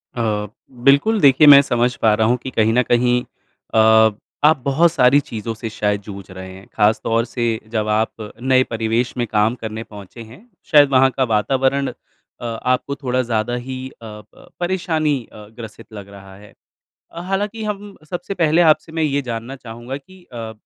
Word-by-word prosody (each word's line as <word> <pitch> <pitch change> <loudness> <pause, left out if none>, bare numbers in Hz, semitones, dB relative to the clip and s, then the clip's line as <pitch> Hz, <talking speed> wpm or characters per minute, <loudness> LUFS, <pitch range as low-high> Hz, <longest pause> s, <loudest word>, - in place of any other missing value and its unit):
अ, 105 -3 -1 0.4
बिल्कुल, 210 +11 +4
देखिए 140 +2 +6
मैं 140 -1 +10
समझ 125 -2 0
पा 110 -2 +4
रहा 110 +1 +2
हूँ 125 +2 +2
कि 130 - -4
कहीं 110 -1 +1
न 125 - +4
कहीं 125 0 +1 0.5
अ, 110 0 +5 0.4
आप 155 -1 +4
बहुत 155 +5 +3
सारी 135 -3 +4
चीज़ों 115 -4 -6
से 115 +1 -6
शायद 105 -2 -1
जूझ 100 -1 -9
रहे 95 0 -9
हैं। 95 +1 -13
ख़ास 110 0 +2
तौर 115 +1 0
से, 120 -1 -3 0.2
जब 110 -1 -2
आप 110 0 -2
नए 130 0 +3
परिवेश 115 +2 -2
में 120 - 0
काम 105 +3 +1
करने 110 -1 -6
पहुँचे 105 +1 -12
हैं, 115 - -13 0.3
शायद 145 -2 +6
वहाँ 130 0 +5
का 130 - +2
वातावरण 135 +5 +1 0.5
अ, - - -6
आपको 125 +4 -2
थोड़ा 130 -3 -1
ज़्यादा 120 0 -2
ही 130 0 -6
अ, - - -20
प 105 -1 -13
परेशानी 170 -5 0 0.2
अ, 105 -1 -12
ग्रसित 115 0 -11
लग 100 -1 -10
रहा 95 -1 -13
है। 105 0 -16 0.6
अ, 170 - -8
हालाँकि 205 +3 -2
हम 205 -1 -5
सबसे 180 +2 -5
पहले 165 -2 +2
आपसे 160 0 +3
मैं 160 0 -1
ये 145 -2 0
जानना 120 +1 -6
चाहूँगा 120 +1 -8
कि 180 +6 -18
अ, 115 -2 -6
120 Hz, 185 wpm, -19 LUFS, 110-140 Hz, 0.6 s, मैं